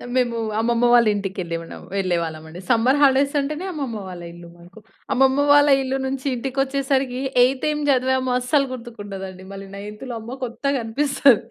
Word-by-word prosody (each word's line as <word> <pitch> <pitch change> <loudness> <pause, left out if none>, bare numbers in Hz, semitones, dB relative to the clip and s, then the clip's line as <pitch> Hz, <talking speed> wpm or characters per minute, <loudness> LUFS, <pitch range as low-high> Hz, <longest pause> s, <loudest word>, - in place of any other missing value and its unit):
మేము 240 -2 +1 0.2
అమ్మమ్మ 235 +1 +2
వాళ్ళింటికెళ్ళి 200 -7 +1
ఉన్నాం. 165 - -11
వెళ్ళేవాళ్ళమండి. 170 -3 -3
సమ్మర్ 250 +3 +3
హాలిడేస్ 280 +1 +4
అంటేనే 300 +5 -3
అమ్మమ్మ 275 -9 -4
వాళ్ళ 180 -2 -8
ఇల్లు 170 0 -12
మనకు. 175 +5 -16 0.3
అమ్మమ్మ 270 +2 +3
వాళ్ళ 290 0 +6
ఇల్లు 265 0 -1
నుంచి 265 0 -4
ఇంటికొచ్చేసరికి 270 0 -1 0.2
ఎయిత్ 260 +1 +1
ఏం 300 0 -1
జదివామో 260 -1 +2
అస్సలు 275 +2 +1
గుర్తుకుండదండి 205 -6 -8
మళ్ళీ 195 0 -8
నైన్త్‌లో 210 +5 -7
అమ్మో! 235 +3 -7
కొత్తగనిపిస్తది. 270 0 +2
245 Hz, 135 wpm, -22 LUFS, 200-270 Hz, 0.3 s, వాళ్ళ